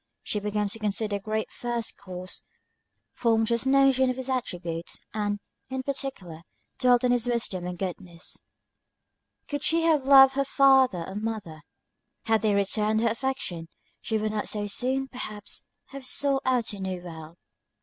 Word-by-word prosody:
She 210 - -1
began 210 0 -1
to 225 - -2
consider 210 0 0
the - - -11
Great 215 +2 -2
First 240 -2 -2
Cause, 185 -1 -6 0.7
formed 225 -2 +2
just 235 +3 0
notions 265 -1 +4
of 255 - -1
his 260 +1 -3
attributes, 175 -9 -3 0.2
and, 205 -1 -1 0.3
in 260 0 -3
particular, 260 - -4 0.4
dwelt 250 -2 +4
on 250 - +3
his 245 -1 +1
wisdom 215 -7 -1
and 180 0 -5
goodness. 180 -2 -5 1.1
Could 290 -1 -3
she 330 +1 +2
have 310 -5 +3
loved 270 -1 +8
her 275 +1 +1
father 265 -9 +4
or 190 - -7
mother, 205 -7 -4 0.6
had 225 -2 +2
they 210 -2 +2
returned 210 +2 +2
her 230 - +3
affection, 230 -9 -3 0.3
she 220 - -1
would 215 0 -1
not 215 -1 -1
so 210 -1 -1
soon, 260 +6 0
perhaps, 215 -6 -4 0.2
have 275 -2 -8
sought 275 0 +2
out 245 -4 +1
a 200 - -7
new 185 -2 -4
world. 165 -1 -9
220 Hz, 160 wpm, -27 LUFS, 200-260 Hz, 1.1 s, loved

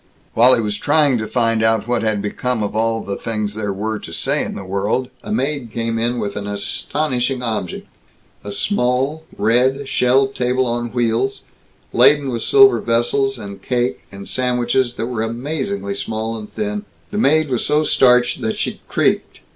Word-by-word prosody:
While 125 +3 +6
he - - 0
was 105 -1 -2
trying 145 0 +2
to 110 - -3
find 115 0 +1
out 110 0 +2
what 120 -1 0
had 110 -2 0
become 115 +2 -2
of 105 - -3
all 115 0 +1
the 100 0 -4
things 105 -2 -3
there 105 -1 -3
were 105 +2 -3
to - - -10
say - - -1
in - - -5
the 100 - -6
world, 100 +7 -1
a - - -6
maid 140 - -1
came 115 0 -2
in 120 +2 0
with 100 -3 -3
an 105 0 -4
astonishing 125 +5 -1
object 110 -7 -3 0.6
a 100 - -6
small, 135 - 0
red, 130 +6 +2
shelved 135 +2 +2
table 125 +1 +1
on 120 0 -1
wheels, 120 +2 0 0.5
laden 140 +3 +5
with 115 -2 -3
silver 405 -1 +6
vessels, 120 +3 +1
and 100 -3 -8
cake, 125 +3 -1
and 100 0 -9
sandwiches 125 0 0
that - - -2
were 120 -2 -3
amazingly 115 -4 -3
small 110 +2 -3
and 105 -1 -8
thin. 210 -1 -3 0.3
The 205 - -2
maid 155 -3 +3
was 125 - +1
so 150 +1 +3
starched 125 -4 +3
that 110 - -2
she - - -3
creaked. - - 0
120 Hz, 180 wpm, -19 LUFS, 110-130 Hz, 0.6 s, While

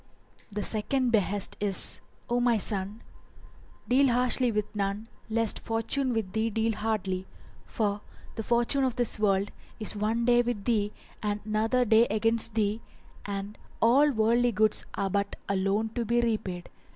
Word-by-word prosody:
The 210 -1 -4
SECOND 245 +3 +1
BEHEST 205 -2 +1
is, 200 -2 +3 0.3
O 240 +1 0
my 240 -2 +3
son: 205 +1 -3 0.8
Deal 265 +4 +4
harshly 250 0 +2
with 210 0 -3
none 200 +2 -2 0.2
lest 225 -1 0
fortune 230 +4 -1
with 220 -5 -2
thee 220 +1 0
deal 225 +1 0
hardly; 195 -4 -2 0.4
for 205 -2 -1 0.3
the 225 - -4
fortune 240 +4 +1
of 255 -2 0
this 245 -4 0
world 200 -1 +1 0.3
is 215 0 +1
one 220 +3 0
day 240 0 +5
with 235 -4 -3
thee 210 -4 +1 0.3
and 210 -1 -1
another 225 +4 +1
day 225 +1 +5
against 225 +2 +1
thee 215 0 0 0.5
and 200 +1 -5 0.2
all 270 +6 +5
worldly 235 0 +2
goods 215 0 +2
are 195 -1 -2
but 200 +1 -1
a 200 - 0
loan 200 +3 0
to 235 +2 -3
be 235 +2 +1
repaid. 210 -7 -2
220 Hz, 155 wpm, -28 LUFS, 205-235 Hz, 0.8 s, day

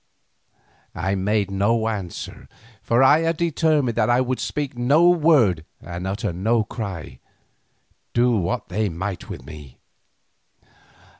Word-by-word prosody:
I 95 +3 -1
made 100 +1 0
no 110 +3 +1
answer, 100 -6 -6 0.3
for 120 +3 +2
I 145 +4 +6
had 165 0 0
determined 155 -6 +1
that 110 -1 +2
I 120 +1 +4
would 130 0 -1
speak 145 -3 -3
no 140 +8 +4
word 150 - +4 0.2
and 90 +2 -6
utter 95 -2 -2
no 110 +6 +1
cry, 95 - -7 0.9
do 120 0 +2
what 90 -4 -2
they 105 +2 0
might 95 +3 -5
with - - -8
me. 75 -4 -11
110 Hz, 130 wpm, -22 LUFS, 95-130 Hz, 0.9 s, I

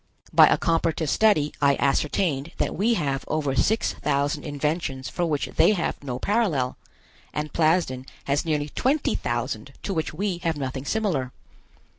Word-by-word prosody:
By - - +8
a - - +3
comparative 165 -2 0
study 180 -10 +3
I 140 -1 +4
ascertained 145 +2 0
that - - -1
we 230 +4 +2
have 140 -7 -1
over 145 -3 -1
six 220 +10 +1
thousand 145 +1 -1
inventions 145 -3 -2
for 175 +4 -1
which 150 -3 0
they 215 - +6
have 175 -6 -2
no 125 -3 -3
parallel, 170 - 0 0.6
and 150 0 -3
Plasden 155 -6 +1 0.2
has 140 +1 0
nearly 150 -2 -1
twenty 275 - +1
thousand 120 +1 -3
to 200 - -2
which 160 -3 -2
we 185 +2 -2
have 165 -3 -1
nothing 135 -1 -4
similar. 165 - -1
150 Hz, 155 wpm, -25 LUFS, 135-175 Hz, 0.6 s, By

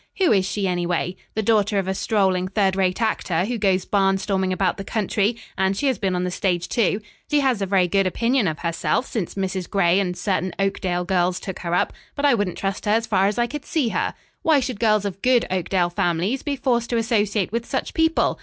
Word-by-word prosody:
Who 375 -4 +3
is 195 -2 +3
she, 200 -1 -1
anyway? 175 0 -1 0.2
The 220 - 0
daughter 210 -1 +2
of 195 -1 0
a 190 - 0
strolling 190 -3 +1
third 195 -1 +1
rate 185 -1 +1
actor, 185 -5 0
who 235 +1 -3
goes 190 -3 +2
barnstorming 195 -1 +1
about 185 -1 0
the 195 - -5
country, 210 +1 0 0.2
and 190 0 +1
she 285 - -1
has 265 -3 +1
been 190 -2 0
on 180 - -1
the 180 - -2
stage, 180 -2 -1
too. 215 -2 +1 0.3
She 295 -1 +3
has 255 -6 +1
a 195 - 0
very 185 -2 +3
good 195 +2 +2
opinion 230 +3 +1
of 155 -2 -2
herself 170 - -1
since 210 -10 -4
Mrs. 190 -2 -3
Gray 185 -2 +3
and 180 -2 -2
certain 185 -1 -1
Oakdale 185 -2 -1
girls 180 -1 +1
took 190 -2 -6
her 170 0 -2
up, - - +1 0.2
but 285 - -1
I 285 - +5
wouldn't 205 -6 -1
trust 195 0 -3
her 210 - +1
as 225 +1 +2
far 195 -3 +2
as 205 - -1
I 240 - +3
could 295 +3 -6
see 300 -9 0
her. - - -1 0.3
Why 315 -3 +4
should 250 -5 -3
girls 215 -3 +2
of 195 -1 -5
good 250 -2 +3
Oakdale 180 -1 0
families 180 +7 0
be 290 -2 -2
forced 245 -3 0
to 235 - 0
associate 210 -4 0
with 235 +1 -3
such 265 - -3
people? 320 0 +1
195 Hz, 230 wpm, -22 LUFS, 185-225 Hz, 0.3 s, I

